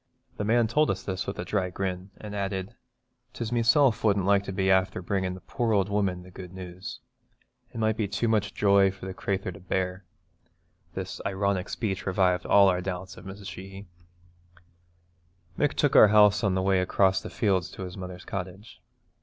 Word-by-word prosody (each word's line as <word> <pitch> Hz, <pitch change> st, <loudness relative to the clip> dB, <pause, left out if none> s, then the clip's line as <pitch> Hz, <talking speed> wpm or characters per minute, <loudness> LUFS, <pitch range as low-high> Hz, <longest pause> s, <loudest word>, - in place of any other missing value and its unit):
The -, -, -2 dB
man 115 Hz, +3 st, +3 dB
told 150 Hz, +8 st, +2 dB
us 95 Hz, -1 st, -2 dB
this 95 Hz, -1 st, -4 dB
with 100 Hz, -, -4 dB
a -, -, -4 dB
dry 95 Hz, -3 st, -1 dB
grin, 95 Hz, 0 st, -4 dB
and 105 Hz, -1 st, -8 dB
added, 100 Hz, +2 st, -3 dB, 0.6 s
''Tis 115 Hz, -1 st, -4 dB
meself 120 Hz, +1 st, +3 dB
wouldn't 100 Hz, -3 st, +2 dB
like 100 Hz, 0 st, +3 dB
to -, -, -4 dB
be 95 Hz, 0 st, 0 dB
afther 95 Hz, +1 st, +2 dB
bringin' 95 Hz, 0 st, -2 dB
the 95 Hz, -, -11 dB
poor 115 Hz, -4 st, -1 dB
ould 100 Hz, 0 st, +1 dB
woman 100 Hz, -3 st, -1 dB
the 90 Hz, -, -14 dB
good 90 Hz, 0 st, -10 dB
news. 90 Hz, 0 st, -8 dB, 0.7 s
It -, -, -10 dB
might 110 Hz, -1 st, +1 dB
be 110 Hz, -3 st, 0 dB
too 100 Hz, +4 st, -1 dB
much 105 Hz, -2 st, 0 dB
joy 100 Hz, -1 st, +4 dB
for 95 Hz, 0 st, -9 dB
the 95 Hz, -, -5 dB
crathur 95 Hz, 0 st, -2 dB
to 90 Hz, -, -11 dB
bear.' 90 Hz, 0 st, -2 dB, 0.9 s
This -, -, -5 dB
ironic 100 Hz, -1 st, -1 dB
speech 100 Hz, -5 st, -3 dB
revived 90 Hz, -1 st, +1 dB
all 100 Hz, -1 st, +6 dB
our 90 Hz, -1 st, +2 dB
doubts 95 Hz, 0 st, -5 dB
of -, -, -13 dB
Mrs. 100 Hz, +1 st, -9 dB
Sheehy. 95 Hz, +1 st, -10 dB, 1.7 s
Mick 145 Hz, +5 st, +1 dB
took 145 Hz, -, +1 dB
our -, -, +9 dB
house 105 Hz, 0 st, +5 dB
on 100 Hz, -2 st, +2 dB
the 95 Hz, -, 0 dB
way 95 Hz, -1 st, +3 dB
across 95 Hz, +1 st, +2 dB
the -, -, -7 dB
fields 95 Hz, -6 st, 0 dB
to 95 Hz, -, -8 dB
his 90 Hz, -1 st, -7 dB
mother's 90 Hz, -1 st, -8 dB
cottage. 95 Hz, +2 st, -7 dB
95 Hz, 190 wpm, -27 LUFS, 95-105 Hz, 1.7 s, our